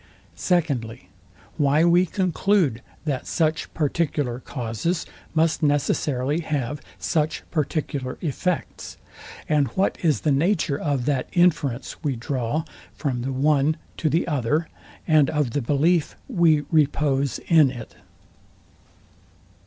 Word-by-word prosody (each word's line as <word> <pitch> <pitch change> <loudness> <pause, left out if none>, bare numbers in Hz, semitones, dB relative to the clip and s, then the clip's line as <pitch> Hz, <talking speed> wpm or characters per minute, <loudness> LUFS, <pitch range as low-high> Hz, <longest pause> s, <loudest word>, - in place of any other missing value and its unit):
Secondly, 130 - -1 0.5
Why 150 +1 +3
we 175 +2 +4
conclude, 185 - +1 0.2
that 140 -5 -2
such 160 -1 0
particular 145 -5 -1
causes 130 - -3 0.3
must 160 +1 +2
necessarily 145 -1 +1
have 145 -4 -3 0.2
such 155 -2 -1
particular 145 -4 -2
effects; 170 +2 -3 0.5
and 150 -3 +2
what 190 - +1
is 155 -4 +2
the 155 - +1
nature 155 0 +1
of 140 -5 -1
that 135 -3 0
inference 150 -8 +1
we 140 -4 0
draw 125 +4 -2 0.3
from 130 -5 -2
the 135 +2 -3
one 145 +3 +2 0.2
to 155 - +1
the 165 +4 +1
other, 150 +2 0 0.4
and 155 -4 +5
of 150 -5 0
the 145 - -1
belief 150 +6 +1
we 170 - +3
repose 145 -4 +2
in 155 -5 +4
it? 120 -3 -8
150 Hz, 115 wpm, -24 LUFS, 135-160 Hz, 0.5 s, and